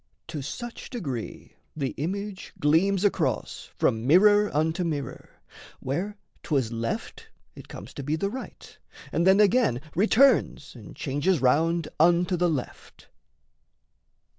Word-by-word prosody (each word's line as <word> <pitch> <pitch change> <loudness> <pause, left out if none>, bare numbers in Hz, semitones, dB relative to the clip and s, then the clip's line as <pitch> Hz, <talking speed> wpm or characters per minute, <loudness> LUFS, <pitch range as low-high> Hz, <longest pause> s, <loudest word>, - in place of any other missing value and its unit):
To 155 -3 -4
such 235 - -7
degree 140 - -6 0.2
the 140 -4 -2
image 195 +5 -5
gleams 185 +7 +2
across 205 - -1
From 115 +2 0
mirror 205 +6 +5
unto 160 +4 0
mirror; 150 -6 -4 0.5
where 185 +10 -3 0.2
'twas 135 -7 -1
left 115 0 -4 0.3
It - - -13
comes 100 +8 -10
to - - -6
be 150 +3 -1
the 200 +5 -2
right, 260 +3 -9 0.3
and 170 +2 +1
then 190 +2 +6
again 210 - +3
Returns 220 - +3
and 115 -5 -12
changes 145 +5 0
round 160 +6 +2
unto 175 +3 +3
the 175 0 +1
left. 145 -6 -6
165 Hz, 125 wpm, -26 LUFS, 140-200 Hz, 0.5 s, then